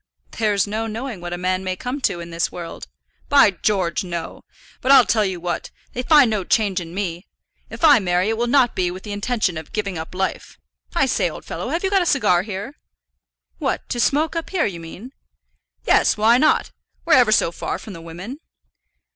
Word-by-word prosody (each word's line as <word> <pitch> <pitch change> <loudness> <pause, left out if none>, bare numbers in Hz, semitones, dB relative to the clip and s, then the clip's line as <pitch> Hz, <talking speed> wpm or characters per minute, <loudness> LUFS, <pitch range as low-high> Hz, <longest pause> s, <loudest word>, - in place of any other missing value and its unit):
"There's 210 -3 +1
no 220 +2 -3
knowing 225 -2 -5
what 175 0 -6
a 175 - -3
man 185 +1 -1
may 185 -1 -2
come 250 +8 -5
to 175 - 0
in 170 0 -9
this 170 0 -1
world." 170 -2 -8 0.4
"By 280 -8 +6
George, 190 -1 -1
no. 170 -2 -6 0.4
But 260 - +2
I'll 265 -3 +8
tell 210 +2 +2
you 190 -3 -2
what, 175 0 -4 0.2
they'll 250 - -2
find 290 -1 +6
no 210 -3 -1
change 200 -2 +1
in 170 +1 -9
me. 180 -2 -4 0.4
If - - -9
I 295 -6 +7
marry 180 +1 +1
it 225 - 0
will 240 +2 -1
not 250 -1 +3
be 180 -1 0
with 185 +2 -8
the 210 - -7
intention 205 -4 -1
of 160 - -12
giving 200 -5 -3
up 160 +3 -8
life. 190 +1 -3 0.4
I - - +3
say, - - +1
old - - -10
fellow, - - -5
have 340 - -2
you 385 - 0
got 390 -1 +4
a 350 - -1
cigar 180 - +3
here?" 205 +6 -6 0.9
"What, - - -2
to 240 - -2
smoke 300 +7 +1
up 330 - -3
here, 365 -5 +1
do 200 - -4
you 170 - -8
mean?" 180 +9 -10 0.7
"Yes; - - +3
why 225 +3 +4
not? 305 +2 +2 0.3
we're 335 - +3
ever 245 -4 +6
so 185 -5 +3
far - - -4
from 210 - -10
the 165 - -10
women." 180 - -8
205 Hz, 215 wpm, -21 LUFS, 180-250 Hz, 0.9 s, I'll